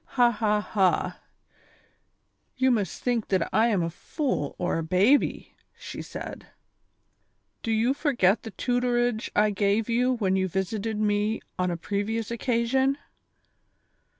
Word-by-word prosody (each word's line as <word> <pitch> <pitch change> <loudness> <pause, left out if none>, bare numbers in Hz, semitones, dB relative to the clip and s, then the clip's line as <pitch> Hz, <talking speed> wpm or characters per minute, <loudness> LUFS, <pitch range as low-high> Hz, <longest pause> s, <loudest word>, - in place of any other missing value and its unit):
" - - -44
Ha! 240 -1 +6
ha! 210 -1 +1
ha! 195 -3 +1 1.4
you 260 0 +3
must 205 -8 -1
think 240 -3 0
that 185 -3 +1
I 225 +2 +4
am 200 -7 +1
a 165 - -2
fool 250 - -3
or 175 -2 -1
a - - -2
baby," 190 - +2 0.2
she - - -7
said. - - -8 1.1
"Do 225 - -4
j 220 0 +2
ou 265 - +3
forget 255 - +2
the 225 - -7
tutorage 245 0 0
I 210 0 +4
gave 205 +2 +1
you 250 +2 +2
when 195 -6 0
you 190 0 +1
visited 210 +4 -2
me 210 +1 +1 0.2
on 180 0 +1
a 170 - -2
previous 210 +5 -2
occasion 250 +3 +1
220 Hz, 145 wpm, -26 LUFS, 195-240 Hz, 1.4 s, Ha